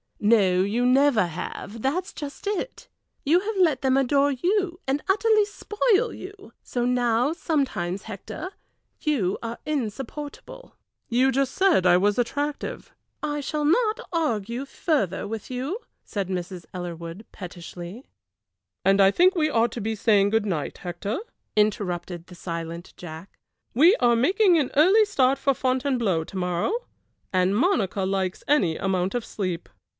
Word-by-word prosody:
"No, 200 -4 +4
you 220 +6 +1
never 255 -4 +4
have, 180 +6 -6
that 310 +9 0
is - - -11
just 290 +4 -8
it. 415 +4 -3 0.4
You 325 +5 +4
have 420 +3 -3
let 320 -8 +3
them 265 0 +3
adore 275 +2 +3
you, 355 +5 0
and 275 +2 0
utterly 430 +1 +4
spoil 425 +2 +1
you; 400 +1 -11
so 245 -1 -2
now 245 +2 +2
sometimes, 260 - -1
Hector, 220 - -7 0.5
you 230 - 0
are 230 0 -5
insupportable." 295 - -5 0.3
"You 255 +3 +3
just 270 0 0
said 375 - +3
I 175 0 +6
was 205 +4 +2
attractive." 285 +5 -3 0.3
"I 295 0 -1
shall 300 +1 -2
not 435 +8 +2
argue 240 - -1
further 275 - -1
with 220 0 -6
you," 265 - -3 0.2
said 195 -3 -4
Mrs. 180 -1 -4
Ellerwood, 175 +2 -6
pettishly. 180 +4 -9 0.8
"And 195 +1 +5
I 195 - +7
think 365 - +4
we 310 -3 +2
ought 230 -4 +2
to 235 - -5
be 220 +2 -2
saying 205 -2 +3
good 220 -1 +2
night, 165 -8 -3
Hector," 180 +6 -4 0.4
interrupted 180 -5 0
the 180 - -12
silent 170 0 -6
Jack. 170 +2 -10 0.4
"We 330 - +6
are 240 -1 +4
making 360 - +4
an 275 - 0
early 380 +9 +6
start 275 -9 +2
for 275 -1 +2
Fontainebleau 255 - 0
to 190 - -8
morrow, 180 - 0 0.6
and 185 +1 +2
Monica 215 - +1
likes 190 -1 -1
any 185 - +3
amount 190 +1 -1
of 240 - -2
sleep." 185 -4 -4
240 Hz, 150 wpm, -25 LUFS, 190-300 Hz, 0.8 s, I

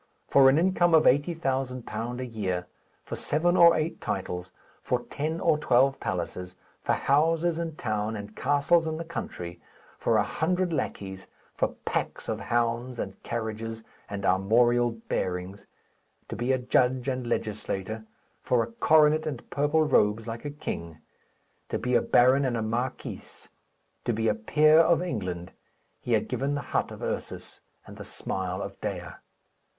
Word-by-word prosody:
For 135 -1 +7
an 135 - +4
income 175 -1 +3
of 155 - +6
£80,000 130 -6 0
a 130 - -3
year; 95 -7 -3 0.4
for - - -5
seven 175 +4 +1
or 170 -1 +7
eight 155 +2 -2
titles; 90 -2 -4 0.3
for 125 -1 -1
ten 155 +3 -2
or 155 -5 +2
twelve 135 +1 +3
palaces; 90 0 -4 0.3
for - - +1
houses 165 +4 +2
in 165 -2 -3
town, 110 -3 -2
and 105 0 -8
castles 145 +4 +2
in 155 0 -2
the 165 - -5
country; 85 - -6 0.4
for 115 - +2
a 105 - +4
hundred 175 - 0
lackeys; 95 -9 -4 0.3
for - - -1
packs - - -2
of - - -2
hounds, 120 +1 -1
and 95 -3 -5
carriages, 110 -1 -4 0.3
and 100 -1 -4
armorial 120 +6 +3
bearings; 95 -4 -4 0.6
to - - -4
be 120 +2 0
a 130 - +3
judge 125 +1 +1
and 130 -2 -2
legislator; 110 -1 -3 0.4
for 120 -2 +2
a - - -8
coronet 155 -8 +4
and 140 -6 -5
purple 145 +3 +2
robes, 110 -6 +2
like 115 +4 -6
a - - -2
king; 85 - -6 0.7
to - - -1
be 125 - -2
a 120 - +5
baron 130 +3 +4
and 125 -3 0
a 110 - -1
marquis; 120 +4 -3 0.8
to 120 - 0
be 110 +1 0
a - - +4
peer 155 +9 +4
of 165 0 +5
England, 90 - -4 0.5
he 120 - -2
had 110 - +2
given 135 +3 -1
the 145 - -2
hut - - +1
of - - -9
Ursus - - -5 0.2
and - - -12
the - - -7
smile 95 0 -4
of 100 0 -8
Dea. 90 -3 -4
120 Hz, 160 wpm, -27 LUFS, 105-150 Hz, 0.8 s, For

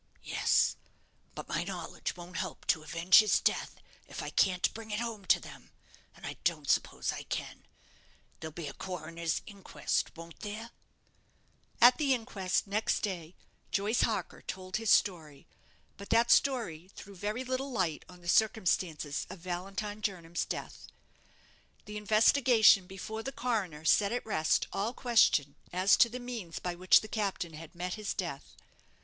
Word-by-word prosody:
"Yes; - - +2 0.6
but - - -7
my - - -1
knowledge - - -5
won't 175 +1 -8
help - - -5
to 160 - +3
avenge 170 +4 +5
his 215 -1 +4
death, - - 0 0.3
if - - -6
I - - -5
can't 185 -2 +2
bring 225 0 -9
it 210 0 -2
home 230 -4 -4
to - - +5
them - - -12 0.5
and - - -11
I - - -6
don't - - 0
suppose - - +1
I - - -6
can. - - -6 0.7
There'll 160 0 -6
be 165 +1 -7
a 140 - -6
coroner's 165 -2 -4
inquest, 200 -4 -3
won't 165 0 -11
there?" 220 +3 -6 1.1
At 245 +3 +7
the 275 -3 +3
inquest, 205 -6 -1
next 210 +2 0
day, 180 -5 -4 0.3
Joyce 210 +4 +1
Harker - - -1
told 185 +1 -5
his 225 -1 -2
story; 155 -9 +2 0.5
but 200 - -10
that 230 +1 +4
story 200 - +2
threw 200 - -11
very 210 +6 -3
little 260 +2 -3
light 180 -10 -1
on 180 -1 -14
the 175 - -12
circumstances 180 -8 +1
of - - -8
Valentine 195 +4 -4
Jernam's 175 -5 -2
death. - - -6 1.0
The 210 0 -7
investigation 215 -1 +5
before 205 +4 -6
the 270 - -5
coroner 200 - -2
set 200 +5 +4
at 245 - -2
rest 160 -7 +1
all 220 +5 -2
question 155 - +3
as 185 +3 +4
to 235 - +6
the 250 +2 -6
means 235 -9 -6
by 180 - -3
which 180 +1 +5
the 215 - -8
captain 200 -6 -2
had 160 +1 -11
met 180 +1 -3
his 215 -2 -4
death. 170 -8 -5
195 Hz, 160 wpm, -31 LUFS, 175-220 Hz, 1.1 s, At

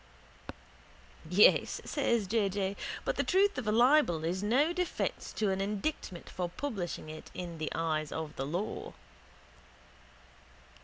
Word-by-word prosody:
—Yes, 190 +4 +5
says 235 -7 +1
J. 205 0 +1
J., 195 0 -2 0.3
but - - -1
the - - +2
truth 390 -4 +3
of 235 - -5
a - - +3
libel 240 - +4
is 180 +3 -1
no 265 +11 +3
defence 360 -1 -2
to 210 -3 +1
an 190 0 -1
indictment 200 - -3
for 180 -1 -3
publishing 185 - -4
it 155 0 -9
in 170 -2 -6
the 155 - -2
eyes 155 -2 -1
of 160 -1 -5
the 135 - -3
law. 180 +8 -3
195 Hz, 140 wpm, -31 LUFS, 170-240 Hz, 0.3 s, Yes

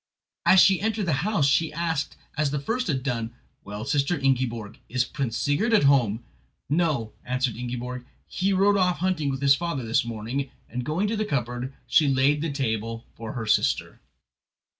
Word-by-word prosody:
As 190 - +7
she 190 0 +5
entered 220 -1 0
the 165 - +1
house 205 -7 +1
she 160 +3 +2
asked, 165 -2 -2 0.2
as 150 -2 +1
the 145 - -2
first 225 - -2
one 145 -6 +1
had 130 - -7
done: 120 -3 -3 0.3
"Well, 105 +2 -6
Sister 140 +5 +1
Ingiborg, 120 -5 -1
is 125 0 +1
Prince 120 -4 -3
Sigurd 210 +11 +2
at 210 - +4
home?" 120 -5 +3 0.4
"No," 150 -8 0
answered 125 -1 -1
Ingiborg," 125 +1 -5 0.2
he 195 +2 -1
rode 200 +1 +4
off 180 -2 +2
hunting 175 -5 0
with 135 0 -3
his 140 0 +7
father 145 -5 -2
this 115 +1 +2
morning"; 120 +4 -4 0.2
and 125 +2 -4
going 165 +10 0
to 220 - -1
the 215 - 0
cupboard 125 - -2
she 150 - +4
laid 140 +2 +3
the 160 -1 -1
table 115 -4 -2
for 115 -1 -7
her 120 -3 -4
sister. 105 - +1
140 Hz, 185 wpm, -25 LUFS, 120-170 Hz, 0.4 s, As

